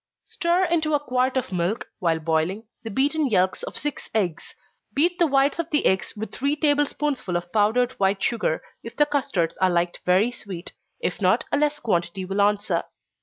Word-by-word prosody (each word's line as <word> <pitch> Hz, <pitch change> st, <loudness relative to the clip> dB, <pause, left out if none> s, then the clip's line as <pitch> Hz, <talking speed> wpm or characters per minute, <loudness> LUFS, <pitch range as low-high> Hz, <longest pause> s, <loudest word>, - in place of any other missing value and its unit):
_ -, -, -44 dB
Stir 345 Hz, +2 st, +1 dB
into 320 Hz, -3 st, +1 dB
a -, -, +2 dB
quart 255 Hz, -1 st, 0 dB
of 255 Hz, -, -2 dB
milk, 180 Hz, +4 st, -1 dB
while 165 Hz, -4 st, +1 dB
boiling, 160 Hz, +6 st, -1 dB, 0.2 s
the 225 Hz, -, -6 dB
beaten 285 Hz, +6 st, +1 dB
yelks 185 Hz, -3 st, +2 dB
of -, -, -5 dB
six 295 Hz, 0 st, -3 dB
eggs. 175 Hz, -6 st, -1 dB, 0.4 s
Beat 345 Hz, +5 st, +2 dB
the 340 Hz, -, +5 dB
whites 275 Hz, +2 st, +2 dB
of 335 Hz, -1 st, -2 dB
the 300 Hz, -2 st, +1 dB
eggs 190 Hz, -1 st, +1 dB
with 220 Hz, +1 st, -5 dB
three 280 Hz, +3 st, 0 dB
table 290 Hz, -1 st, +3 dB
spoonsful 275 Hz, -13 st, -2 dB
of 175 Hz, 0 st, -8 dB
powdered 225 Hz, +4 st, +3 dB
white 195 Hz, 0 st, +1 dB
sugar, 220 Hz, -9 st, 0 dB, 0.2 s
if 230 Hz, -, -9 dB
the 295 Hz, -, +4 dB
custards 265 Hz, -, -1 dB
are 185 Hz, -, +4 dB
liked 175 Hz, 0 st, 0 dB
very 190 Hz, +6 st, +3 dB
sweet 190 Hz, -7 st, -8 dB, 0.3 s
if -, -, -2 dB
not, -, -, +3 dB
a -, -, +2 dB
less 295 Hz, 0 st, +1 dB
quantity 185 Hz, -5 st, -1 dB
will 195 Hz, +2 st, 0 dB
answer. 205 Hz, +1 st, +1 dB
225 Hz, 195 wpm, -24 LUFS, 185-290 Hz, 0.4 s, the